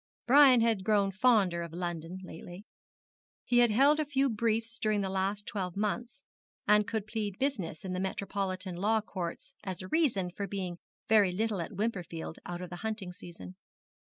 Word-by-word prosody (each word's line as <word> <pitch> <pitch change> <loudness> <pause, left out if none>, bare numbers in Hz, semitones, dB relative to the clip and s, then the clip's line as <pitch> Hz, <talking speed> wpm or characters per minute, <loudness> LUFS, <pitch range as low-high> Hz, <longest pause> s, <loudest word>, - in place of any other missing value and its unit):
Brian 260 -1 +7
had 225 -4 +2
grown 200 -1 +2
fonder 200 -5 +3
of 170 -1 -6
London 175 0 -4
lately. 180 +2 -10 0.8
He 240 - +3
had 240 -1 +6
held 275 +8 +5
a 310 - +1
few 275 -2 +2
briefs 225 +2 -1
during 215 -1 +1
the 190 -1 -2
last 195 +2 -1
twelve 185 -3 -4
months 235 +6 -2 0.4
and 210 0 +5
could 220 -3 -2
plead 210 -3 -3
business 195 - -2
in 185 - -3
the 180 - -2
metropolitan 190 -1 -3
law 215 +4 +2
courts 180 -5 -6
as 185 -1 -4
a - - -7
reason 210 - +1
for 200 +2 -4
being 180 -3 -4 0.3
very 210 -4 +5
little 210 0 -1
at 170 - -6
Wimperfield 180 -6 -3
out 175 0 -5
of 180 - -8
the 175 - -5
hunting 210 -1 -4
season. 175 0 -10
200 Hz, 175 wpm, -31 LUFS, 180-225 Hz, 0.8 s, Brian